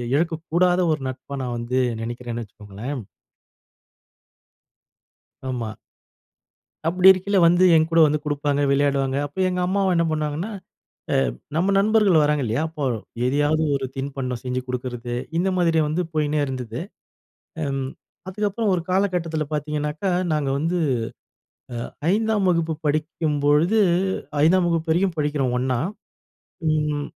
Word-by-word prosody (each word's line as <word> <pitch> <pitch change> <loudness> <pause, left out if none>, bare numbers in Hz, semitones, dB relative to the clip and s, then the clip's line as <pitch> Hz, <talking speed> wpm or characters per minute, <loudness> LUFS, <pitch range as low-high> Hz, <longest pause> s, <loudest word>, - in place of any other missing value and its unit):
இழக்கக்கூடாத 170 +3 +1
ஒரு 150 - -4
நட்பா 130 +2 -8
நான் 120 -1 -3
வந்து 120 +2 -2 0.2
நெனைக்கிறேன்னு 120 0 -5
வச்சுக்கோங்களேன். 105 +6 -7 2.5
ஆமா. 115 -4 -4 1.1
அப்படி 180 +2 +4
இருக்கையில 190 +2 +1
வந்து 175 +2 +4
என் 160 0 +4
கூட 165 - +4
வந்து 150 +1 0
குடுப்பாங்க, 145 -1 0
விளையாடுவாங்க. 140 -1 +1
அப்ப 145 +6 -4
எங்க 180 - -2
அம்மாவ 190 -1 +1
என்ன 170 - +3
பண்ணுவாங்கன்னா, 155 +6 -2 0.8
அ - - -11 0.2
நம்ம 190 +4 +2
நண்பர்கள் 205 -5 +4
வராங்க 150 -1 +1
இல்லையா? 115 +6 0
அப்போ 155 -3 -5 0.4
எதையாவது 145 +4 +2
ஒரு 135 -1 -3
தின்பண்டம் 135 -3 -4
செஞ்சு 125 0 -1
கொடுக்குறது, 120 -1 -4 0.2
இந்த 185 +3 +2
மாதிரி 165 -2 +3
வந்து 170 +4 -1
போயின்னே 150 -1 +1
இருந்துது. 125 -3 -5 0.9
ம் 135 -1 -2 0.4
அதுக்கப்புறம் 210 +2 -1
ஒரு 175 - 0
காலகட்டத்தில 180 -5 0
பாத்தீங்கனாக்கா, 150 +3 -2 0.2
நாங்க 150 -3 0
வந்து, 165 +5 0 1.1
அ - - -24 0.2
5ஆம் 215 -2 +1
வகுப்பு 165 -2 +1
படிக்கும்பொழுது, 155 +4 +1 0.6
5ஆம் 175 +2 +4
வகுப்பு 165 -1 -1
வரையும் 180 +1 +1
படிக்கிறோம் 145 -4 0
ஒண்ணா, 130 -1 0 0.9
ம் 150 -1 0
150 Hz, 120 wpm, -23 LUFS, 135-175 Hz, 2.5 s, அப்படி